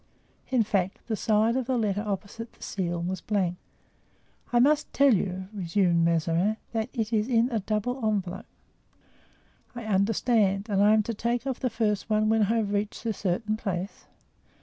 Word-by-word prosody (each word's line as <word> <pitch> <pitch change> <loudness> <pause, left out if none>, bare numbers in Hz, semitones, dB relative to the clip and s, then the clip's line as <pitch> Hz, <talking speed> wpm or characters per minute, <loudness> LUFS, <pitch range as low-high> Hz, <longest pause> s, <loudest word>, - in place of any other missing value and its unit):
In 255 -3 +3
fact, 195 -3 0
the 225 - -2
side 220 +2 +2
of 260 -2 -1
the 260 -2 +1
letter 205 -3 0
opposite 210 +2 -5
the - - -14
seal 175 -3 -2
was 185 0 -3
blank. 185 -4 -1 0.9
"I 240 - +2
must 290 +5 +3
tell 280 -2 +5
you," 185 -1 -1
resumed 175 -3 +1
Mazarin, 170 +5 +1
"that 225 +1 -2
it 225 -3 -3
is 215 0 +2
in 240 0 +2
a 225 - 0
double 215 +5 -2
envelope." 200 -1 -1 1.3
"I 240 -2 -6
understand; 205 0 +1
and 200 -1 +2
I 210 +1 +6
am 215 - +3
to 230 - -3
take 235 +3 -1
off 265 -2 -2
the 255 - 0
first 215 -2 -1
one 215 0 +2
when 220 0 +3
I 215 +3 +2
have 210 -2 -1
reached 205 +2 -2
a 225 - 0
certain 210 +3 -1
place?" 195 -2 -4
215 Hz, 175 wpm, -27 LUFS, 195-230 Hz, 1.3 s, I